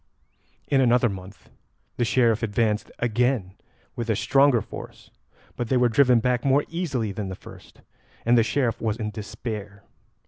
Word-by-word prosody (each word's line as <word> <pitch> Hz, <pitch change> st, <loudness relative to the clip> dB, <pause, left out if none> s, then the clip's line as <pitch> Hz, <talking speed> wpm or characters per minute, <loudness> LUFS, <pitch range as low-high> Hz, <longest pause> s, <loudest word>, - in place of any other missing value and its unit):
In 135 Hz, -1 st, +3 dB
another 125 Hz, -1 st, +4 dB
month 95 Hz, +1 st, -10 dB, 0.5 s
the 120 Hz, -, +1 dB
Sheriff 115 Hz, -2 st, +2 dB
advanced 110 Hz, -1 st, 0 dB
again 120 Hz, -4 st, 0 dB, 0.4 s
with 120 Hz, -2 st, -4 dB
a 110 Hz, -, +2 dB
stronger 135 Hz, +2 st, +4 dB
force, -, -, -10 dB, 0.4 s
but 120 Hz, -2 st, -4 dB
they 130 Hz, -, +3 dB
were 125 Hz, -1 st, +3 dB
driven 125 Hz, 0 st, +4 dB
back 125 Hz, 0 st, 0 dB
more 140 Hz, +1 st, +3 dB
easily 145 Hz, -, -2 dB
than 100 Hz, 0 st, -5 dB
the 95 Hz, -, -5 dB
first, -, -, -15 dB, 0.4 s
and 120 Hz, +1 st, +4 dB
the 115 Hz, -, +6 dB
Sheriff 120 Hz, +1 st, 0 dB
was 110 Hz, -1 st, -1 dB
in 110 Hz, -2 st, -3 dB
despair. 105 Hz, -1 st, -7 dB
115 Hz, 160 wpm, -24 LUFS, 105-125 Hz, 0.5 s, the